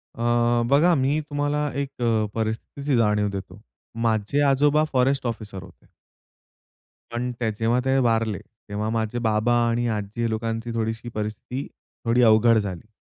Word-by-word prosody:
अ, 120 0 +2
बघा 155 +6 +5
मी 140 +2 +1
तुम्हाला 145 0 0
एक 140 - -3
अ, 115 -2 +2
परिस्थितीची 115 +5 -2
जाणीव 105 -2 +2
देतो. 100 0 -7 0.4
माझे 110 +5 +1
आजोबा 145 +2 +4
फॉरेस्ट 130 +1 +2
ऑफिसर 105 -5 -5
होते. 95 -2 -17 1.2
पण 125 +1 -2
त्या 115 -2 0
जेव्हा 115 +2 +2
ते 135 0 +2
वारले, 115 -3 0 0.3
तेव्हा 105 +1 -2
माझे 115 +1 -1
बाबा 110 +1 +1 0.2
आणि 120 +1 0
आजी 110 +3 -3
लोकांची 115 +1 -3
थोडीशी 115 +1 -3
परिस्थिती 110 +4 -5 0.4
थोडी 115 +2 +3
अवघड 110 +1 +5
झाली. 100 -1 -4
115 Hz, 140 wpm, -24 LUFS, 110-125 Hz, 1.2 s, बघा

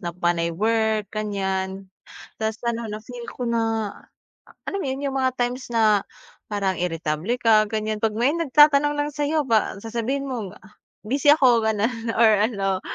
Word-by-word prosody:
na 170 -2 -5
panay 175 -1 0
work, 220 +1 0
ganiyan. 190 -2 -3 0.5
Tas 220 0 -2
ano, 235 -1 -2
na 210 0 -5
feel 240 +1 -9
ko 250 - -5
na 225 -2 0 0.6
ah, - - -19
alam 395 - -2
mo - - -3
'yun, 265 +2 -3
'yung 270 - -4
mga 260 -1 +1
times 245 +1 -2
na 215 -3 +3 0.5
parang 195 -3 -1
iritable 165 +3 -2
ka 220 -2 +5
ganiyan 215 0 -2
'pag 220 -1 +1
may 245 +5 +2
nagtatanong 295 -2 +4
lang 290 0 0
sa'yo 295 +1 0
pa 220 -4 +2
sasabihin 235 +5 -3
mong, 225 -8 -5
"ah, 190 +3 -20 0.3
busy 275 +6 0
ako," 255 -6 +5
gano'n 225 +2 -1
or 230 -1 +6 0.2
ano, 195 -4 -2
225 Hz, 165 wpm, -23 LUFS, 205-250 Hz, 0.6 s, or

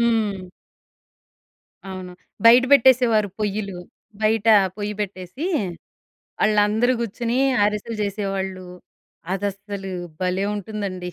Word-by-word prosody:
హ్మ్, 235 0 +3 0.2
హ్మ్. 185 -1 -11 1.4
అవును. 185 -1 -7 0.3
బయట 240 +2 +8
బెట్టేసేవారు 245 -5 +5
పొయ్యలు, 200 -3 -2 0.4
బయట 220 0 +1 0.3
పొయ్యి 210 0 -3
పెట్టేసీ, 185 - -5 1.0
ఆళ్ళందరూ 215 +3 +3
గూర్చొనీ 235 +2 -2 0.3
ఆరిసెలు 210 +2 -2
జేసేవాళ్ళు, 195 -2 -3 0.7
అదసలు 200 0 -5 0.3
భలే 185 +1 0
ఉంటుందండి. 195 -3 -5
205 Hz, 85 wpm, -22 LUFS, 190-225 Hz, 1.4 s, బయట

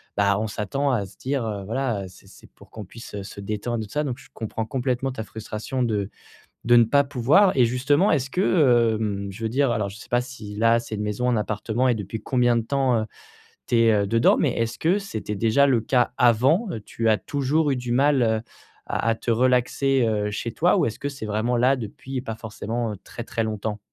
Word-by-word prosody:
Bah, 100 -1 +2
on 110 - -1
s'attend 125 +7 -1
à 110 -6 0
se - - -18
dire, 135 -1 -2
heu, 100 -3 -4
voilà, 115 -3 -2
heu, - - -6
c'est 90 - -17
c'est - - -16
pour - - -18
qu'on 110 - -9
puisse, 115 +2 -11
heu, 100 - -5
se 100 0 -9
détendre 110 +3 -3
et - - -6
tout - - -19
ça 150 +1 0
donc 130 -2 -3
je - - -17
comprends 110 0 -4
complètement 130 +2 -1
ta 125 -3 -5
frustration 110 +4 -5
de 105 -4 -1 0.6
de 120 +1 +5
ne 120 - +7
pas 140 +5 +3
pouvoir. 145 - +3
Et 125 - +5
justement 140 - +2
est-ce 135 -3 0
que, 125 - +3
hem, 100 -2 -2
je 100 - -10
veux 110 - 0
dire 135 +3 +1
alors 105 -3 -1
je 100 - -10
sais - - -13
pas 120 - +3
si 120 -5 -8
là 115 +1 +3
c'est 110 -2 -6
une 105 - -3
maison, 105 +4 -1
un 120 - +2
appartement 110 +3 -1
et 125 - +3
depuis 105 +1 -5
combien 120 -1 +2
de - - -1
temps, 130 -2 +1
heu, 110 - -3 0.6
tu - - +1
es, 115 -1 +5
heu, 100 -1 +1
dedans, 115 +3 +4
mais - - +2
est-ce 115 0 -2
que 175 +5 +2
c'était 110 - -5
déjà 115 +7 +3
le 125 -5 +2
cas 125 +1 +1
avant? 130 - +3
Heu, - - -4
tu 110 +2 -2
as 110 - +4
toujours 145 +4 0
eu - - +1
du 125 -1 -4
mal, 135 +1 +3
heu, 110 -1 +1 0.5
à 115 - -1
à 115 - +2
te 115 - -6
relaxer, 130 +2 +2
heu, 105 -1 -1
chez 115 +2 -4
toi 175 - +3
ou - - +2
est-ce 115 - -3
que 140 - -3
c'est 135 -5 -7
vraiment 110 +3 0
là 130 +3 +4
depuis 125 +2 -6
pas 115 -4 -5
forcément, 110 0 -4
heu, - - -6
très 120 - -8
très 115 -2 -2
longtemps? 105 -1 -3
115 Hz, 240 wpm, -24 LUFS, 110-130 Hz, 0.6 s, ne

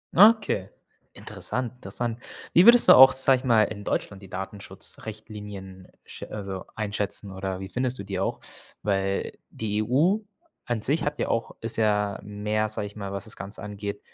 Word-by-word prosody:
Okay, 205 - +5 0.4
interessant, 125 -1 -4
interessant. 120 -2 -4 0.4
Wie 175 - +7
würdest 235 0 +9
du - - +11
auch, 130 +1 +10
sage 130 0 +3
ich 125 - -13
mal, 115 -4 +5
in 105 -1 -4
Deutschland 100 -1 -3
die 95 - -13
Datenschutzrichtlinien 100 0 -8 0.2
schä - - -8
also, 100 -3 -6
einschätzen 105 -1 -3
oder 95 0 -4
wie 95 - -6
findest 125 +1 -1
du - - -4
die 95 -1 -3
auch? - - -1 0.4
Weil 95 -1 -1 0.2
die 105 -1 -2
EU 155 - +3 0.5
an 120 -3 -2
sich 145 +8 +1
hat 145 - -2
ja - - 0
auch 115 - -1
ist 115 0 -2
ja 105 -2 +1
mehr, 105 +1 -1
sage 105 -1 -3
ich 100 - -14
mal, 100 -2 -5
was 100 -1 -4
das 110 - -6
Ganze 100 +2 -8
angeht 100 0 -5
105 Hz, 175 wpm, -26 LUFS, 100-120 Hz, 0.5 s, du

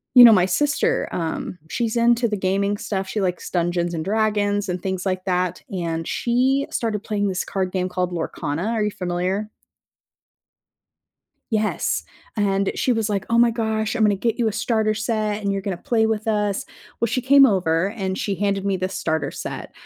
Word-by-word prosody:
You 250 - +11
know, 235 - +11
my 185 -4 +5
sister, 295 - +1
um, 170 +1 -3
she's 235 +2 -1
into 235 0 +3
the 210 - -1
gaming 200 +2 0
stuff, 195 -2 -3
she 210 - -3
likes 180 -3 -2
Dungeons& 175 0 0
Dragons 205 0 0
and 180 0 -2
things 190 -1 -3
like 185 0 -2
that, 180 -1 0
and 165 -4 -3
she 260 +3 +1
started 215 -3 -2
playing 205 -2 -1
this 185 -2 -1
card 190 -1 -3
game 185 -1 -1
called 180 -1 -2
Lorcana, 165 +2 -3
are 225 -2 0
you 210 - 0
familiar? 185 +3 -2 2.0
Yes, 215 -1 0 0.3
and 200 -2 +1
she 255 - +1
was 225 -3 +1
like, 200 -2 -1
"Oh 230 - +3
my 235 0 +5
gosh, 220 -1 -1
I'm 235 - -1
gonna 210 -1 +4
get 225 +4 -1
you 235 - +2
a - - +1
starter 220 0 0
set 215 0 -1
and 200 -1 0
you're 195 0 -2
gonna 195 -3 -3
play 225 +4 +1
with 220 0 -2
us." 210 -2 0 0.3
Well, 235 - +2
she 255 +3 -1
came 275 +2 +7
over 185 -5 +2
and 190 -4 -3
she 200 - -1
handed 200 +1 -1
me 195 -1 +1
this 185 +1 -3
starter 160 -3 -1
set, - - -6
205 Hz, 185 wpm, -22 LUFS, 185-220 Hz, 2.0 s, You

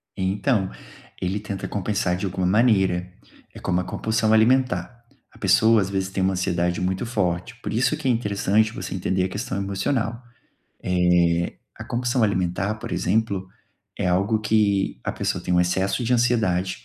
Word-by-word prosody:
Então, 95 +2 0 0.5
ele 95 +3 -1
tenta 100 -2 -5
compensar 100 -2 -1
de 90 - -3
alguma 95 -1 -2
maneira. 95 -4 +2 0.4
É - - -10
como 90 0 0
a - - -5
compulsão 110 +4 0
alimentar. 115 -2 +2 0.3
A - - -19
pessoa, 110 -1 +4
às 95 - -2
vezes, 95 -1 -2
tem 95 0 -2
uma 95 +1 +2
ansiedade 90 -1 0
muito 95 +4 -1
forte, 100 -2 -2
por 115 - -5
isso 125 +3 +1
que 150 - -4
é - - +4
interessante 110 -1 +1
você 90 -4 -6
entender 95 0 0
a 95 - -1
questão 100 -1 -4
emocional. 110 +5 -2 0.6
Eh, 90 -1 +2 0.2
a - - -9
compulsão 125 +1 -1
alimentar, 100 0 0
por 110 - -8
exemplo, 100 -1 0 0.5
é - - 0
algo 100 +5 +2
que 105 - +1
a - - -1
pessoa - - -2
tem - - -1
um 90 - +4
excesso 95 +6 0
de 125 - +1
ansiedade, 105 - +1
100 Hz, 165 wpm, -23 LUFS, 90-110 Hz, 0.6 s, pessoa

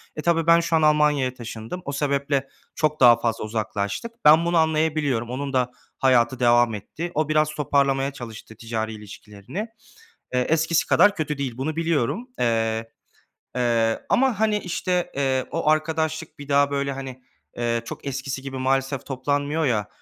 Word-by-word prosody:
E, 150 - -4
tabii 165 0 +1
ben 170 0 +7
şu 170 0 0
an 160 - +3
Almanya'ya 150 -4 +3
taşındım. 115 +6 -7
O 140 - -3
sebeple 140 -1 0 0.3
çok 155 -1 0
daha 120 -2 +8
fazla 115 -2 -1
uzaklaştık. 105 - -3
Ben 155 +3 +7
bunu 170 0 +2
anlayabiliyorum. 155 -6 +1
Onun 135 +2 -4
da 125 -1 +1 0.3
hayatı 130 -1 +3
devam 120 -1 +4
etti. 150 - -6
O, 155 0 0
biraz 155 0 +3
toparlamaya 140 -2 +1
çalıştı 115 -4 -10
ticari 110 -1 -3
ilişkilerini. 105 - -8 0.7
Eee, 125 - +2
eskisi 160 +4 +1
kadar 205 0 +4
kötü 150 -2 -2
değil. 130 -4 -4
Bunu 150 +4 -3
biliyorum. 165 - -1
Eee, 115 -1 0 0.7
eee, 115 -2 +1
ama, 255 -5 +2
hani, 215 -1 +2
işte, 180 -1 -2
eee, 135 -2 0
o 165 -2 0
arkadaşlık 155 0 -1
bir 145 - -9
daha, 140 0 +3
böyle, 140 0 -1
hani, 130 -1 -8 0.4
eee, 120 -1 0
çok - - -8
eskisi 135 0 -4
gibi 135 -1 -6
maalesef 135 +1 0
toplanmıyor 145 +4 -1
ya, 105 -6 0
140 Hz, 160 wpm, -23 LUFS, 120-155 Hz, 0.7 s, daha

